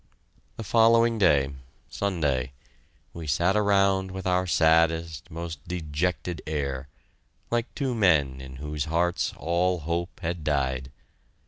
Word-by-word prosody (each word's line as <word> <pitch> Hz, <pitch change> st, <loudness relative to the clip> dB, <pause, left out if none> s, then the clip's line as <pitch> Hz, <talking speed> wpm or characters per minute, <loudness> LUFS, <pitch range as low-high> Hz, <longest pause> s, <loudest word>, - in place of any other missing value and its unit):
The 115 Hz, -, -5 dB
following 115 Hz, +2 st, +4 dB
day 70 Hz, -8 st, +3 dB, 0.3 s
Sunday 75 Hz, -10 st, -1 dB, 0.6 s
we 85 Hz, -2 st, -7 dB
sat 85 Hz, +7 st, +2 dB
around 100 Hz, -2 st, +3 dB
with 95 Hz, 0 st, -7 dB
our 90 Hz, 0 st, +1 dB
saddest, 80 Hz, -1 st, +2 dB
most 85 Hz, -2 st, -6 dB
dejected 85 Hz, -1 st, -2 dB
air, 70 Hz, -3 st, -3 dB, 0.6 s
like 120 Hz, +1 st, 0 dB
two 135 Hz, -3 st, -1 dB
men 75 Hz, -, +2 dB
in 65 Hz, 0 st, -9 dB
whose 75 Hz, +1 st, -4 dB
hearts 85 Hz, +2 st, 0 dB
all 85 Hz, +1 st, 0 dB
hope 85 Hz, +3 st, -3 dB
had 85 Hz, -1 st, -3 dB
died. 65 Hz, -3 st, -1 dB
85 Hz, 120 wpm, -26 LUFS, 75-95 Hz, 0.6 s, following